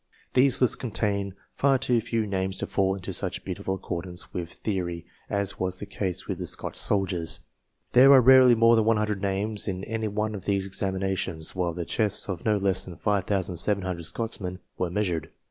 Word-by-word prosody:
These 130 0 +4
lists 125 0 +4
contain 100 -4 -2 0.2
far 135 -1 +3
too 125 -3 +1
few 115 -1 -1
names 95 -1 -2
to - - -2
fall 95 -1 +1
into 95 0 -6
such 90 +1 -3
beautiful 95 0 -3
accordance 90 -1 -6
with 85 -1 -4
theory, 85 -5 -3 0.2
as 100 -1 -2
was 95 0 -1
the 105 - -6
case 95 -3 -3
with - - -3
the - - -3
Scotch - - -3
soldiers. 95 -4 0 0.5
There 130 +3 +7
are 135 - +9
rarely 130 -1 +7
more 115 +1 +5
than 110 -1 +3
100 105 -3 +1
names 100 +2 -2
in 95 -1 -3
any 110 0 -2
one 105 +1 -2
of 100 - -7
these 100 -1 0
examinations, 95 -4 -1
while 90 -2 -1
the 85 -1 -3
chests 105 +1 0
of 95 -5 -4
no 110 -1 +3
less 95 -2 +1
than 85 -3 -10
5,700 95 -2 0
Scotchmen 95 -1 -4 0.2
were 90 - -1
measured. 85 -4 -1
100 Hz, 180 wpm, -26 LUFS, 90-110 Hz, 0.5 s, are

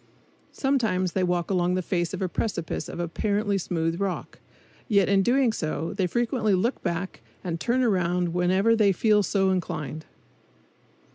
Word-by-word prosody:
Sometimes 220 -10 0
they 190 - -1
walk 175 0 0
along 180 -1 +1
the 185 - -1
face 175 -1 -1
of 190 0 -3
a - - +1
precipice 175 -3 -3
of - - -7
apparently 200 +4 0
smooth 165 0 -2
rock; 195 -2 -3 0.5
yet 200 -5 +3
in 195 -1 +4
doing 245 +2 +3
so 160 -2 -3
they 195 -2 0
frequently 230 0 +1
look 230 +8 0
back 175 -2 -3 0.2
and 170 -2 -3
turn 250 +8 +1
around 180 -5 +1
whenever 185 +5 +3
they 205 -3 +4
feel 210 +2 +3
so 195 -1 +1
inclined. 155 -4 -3
190 Hz, 155 wpm, -26 LUFS, 175-210 Hz, 0.5 s, in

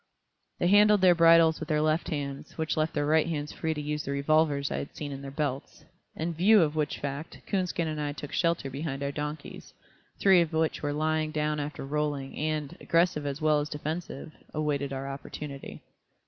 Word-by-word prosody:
They - - -1
handled 205 +2 +6
their 185 -1 +7
bridles 165 -1 +6
with 160 - -6
their 150 -1 +2
left 155 +2 +1
hands, 140 -3 -5
which 160 -1 -1
left 155 +1 0
their 145 -1 +1
right 155 +2 +3
hands 150 -2 -3
free 160 0 -2
to - - -4
use 150 0 -2
the - - -6
revolvers 140 0 +2
I - - -1
had - - -7
seen 145 -2 -5
in 135 0 -6
their 140 - -7
belts; 140 -1 -4 0.3
in 165 +2 -2
view 195 +4 +5
of 150 -1 -1
which 150 -1 -1
fact, 140 +3 -5
Coonskin 180 -4 -1
and 155 -1 -3
I 145 -1 -1
took 145 0 -8
shelter 170 -5 0
behind 140 0 -4
our 140 - -1
donkeys, 150 +1 -6 0.4
three 190 -3 +6
of 165 -1 -2
which 160 0 0
were 145 - -1
lying 155 +1 0
down 150 -1 -1
after 145 -1 -5
rolling, 145 -1 -2
and, 155 -2 -2
aggressive 165 -3 +2
as 140 +2 -4
well 155 -1 +4
as 145 +1 -3
defensive, 155 0 -5 0.2
awaited 145 -2 -1
our 135 0 -4
opportunity. 140 0 -7
150 Hz, 200 wpm, -28 LUFS, 145-160 Hz, 0.4 s, their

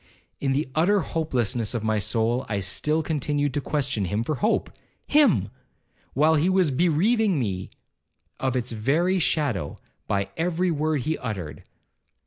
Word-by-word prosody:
In 135 - 0
the 145 +2 0
utter 190 +6 +3
hopelessness 125 -9 -1
of 115 - -2
my 110 -1 +1
soul, 115 +4 0
I 100 -2 -1
still 150 +11 0
continued 145 -2 -1
to 145 - -1
question 135 -8 -1
him 105 +5 -1
for 155 - -2
hope—him! 225 - +1 0.7
while 155 +4 +4
he 160 +3 +2
was 185 -5 +3
bereaving 180 - +2
me 95 -8 -2 0.7
of 130 -1 -1
its 125 -1 -1
very 155 - +1
shadow, 140 - 0 0.3
by 100 -1 -1
every 175 +2 0
word 155 -2 0
he 155 +6 -2
uttered. 100 - -6
145 Hz, 140 wpm, -25 LUFS, 115-165 Hz, 0.7 s, while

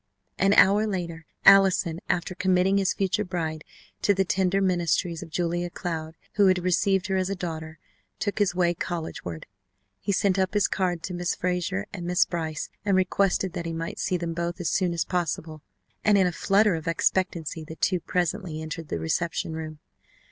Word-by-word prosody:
An 195 +1 +4
hour 205 +2 +5
later 170 -5 -4 0.2
Allison, 190 -4 +6
after 180 +1 0
committing 185 +1 +2
his 195 -1 +2
future 200 +1 0
bride 160 -5 -3 0.4
to 205 - +3
the 195 0 +2
tender 190 +1 +1
ministries 175 -2 0
of - - -8
Julia 175 +1 -1
Cloud, 160 -2 -5 0.2
who 200 -2 +6
had 185 0 +4
received 190 +1 +2
her 190 -2 0
as 185 0 0
a 200 - -1
daughter, 160 -3 -6 0.4
took 205 0 -2
his 200 -3 +2
way 175 -1 +2
collegeward. 160 - -5 0.5
He - - -2
sent 195 0 +2
up 190 +2 0
his 205 - +4
card 180 -3 -1
to 185 - -4
Miss 175 0 -1
Frazer 180 - -1
and 175 -3 -5
Miss 180 0 +3
Brice 160 -3 -4
and 200 -2 +2
requested 185 -1 +1
that 170 - -4
he 165 - -3
might 165 0 -5
see 185 -2 0
them 170 -1 -3
both 170 +2 -3
as 175 - -1
soon 185 -2 +1
as 170 -1 -1
possible, 160 -3 -3 0.4
and 210 -1 +5
in 190 - +4
a 180 - +1
flutter 200 +4 +3
of 160 -1 -4
expectancy 165 -1 0
the 160 +1 -9
two 180 +2 +1
presently 175 -2 -2
entered 160 0 -6
the - - -2
reception 160 - -2
room. 155 -1 -6
180 Hz, 185 wpm, -26 LUFS, 165-190 Hz, 0.5 s, Allison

